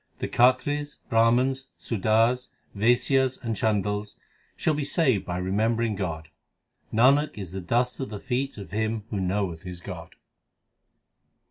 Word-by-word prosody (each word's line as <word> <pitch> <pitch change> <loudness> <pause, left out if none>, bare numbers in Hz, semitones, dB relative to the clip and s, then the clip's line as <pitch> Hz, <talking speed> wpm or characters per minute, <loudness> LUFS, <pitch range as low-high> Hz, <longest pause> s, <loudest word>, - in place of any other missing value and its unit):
The - - -3
Khatris, 145 +4 +2
Brahmans, 125 +4 +3
Sudars, 115 +3 +1 0.3
Vaisyas, 125 +4 +2
and 115 -2 -3
Chandals 105 0 -1 0.4
shall 160 - +1
be 150 0 -1
saved 140 - +1
by 90 - -2
remembering 110 +4 0
God. 80 -5 -4 0.6
Nanak 140 +6 +4
is 95 -5 -6
the 95 0 -5
dust 120 +7 0
of 135 - -3
the 105 -1 -6
feet 130 +4 -2
of 100 -5 -9
him 110 +1 -1
who 105 - -1
knoweth 95 -3 -1
his 90 -2 -8
God. - - -9
115 Hz, 135 wpm, -26 LUFS, 100-130 Hz, 0.6 s, Nanak